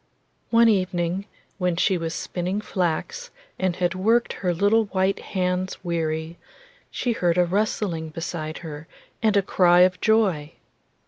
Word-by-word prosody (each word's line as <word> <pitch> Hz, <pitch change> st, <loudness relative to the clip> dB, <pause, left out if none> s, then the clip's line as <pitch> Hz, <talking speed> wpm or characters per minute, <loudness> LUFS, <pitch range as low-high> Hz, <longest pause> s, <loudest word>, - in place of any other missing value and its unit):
One 230 Hz, 0 st, +5 dB
evening, 185 Hz, -2 st, 0 dB, 0.3 s
when 180 Hz, -2 st, +1 dB
she 190 Hz, +2 st, +2 dB
was 165 Hz, -1 st, -3 dB
spinning 180 Hz, +3 st, -3 dB
flax, 210 Hz, -, -2 dB, 0.3 s
and 185 Hz, -2 st, 0 dB
had 180 Hz, 0 st, 0 dB
worked 225 Hz, +6 st, +2 dB
her 180 Hz, -2 st, -1 dB
little 205 Hz, +6 st, +3 dB
white 190 Hz, -1 st, 0 dB
hands 185 Hz, -1 st, -2 dB
weary, 165 Hz, -1 st, -2 dB, 0.5 s
she 245 Hz, -, -2 dB
heard 175 Hz, -6 st, +1 dB
a 180 Hz, -, +4 dB
rustling 180 Hz, -3 st, -1 dB
beside 155 Hz, -1 st, -5 dB
her 150 Hz, 0 st, -8 dB, 0.3 s
and 215 Hz, -2 st, +3 dB
a 200 Hz, -, +3 dB
cry 175 Hz, -1 st, +4 dB
of 180 Hz, 0 st, +3 dB
joy. 190 Hz, -9 st, +2 dB
180 Hz, 140 wpm, -24 LUFS, 170-200 Hz, 0.5 s, One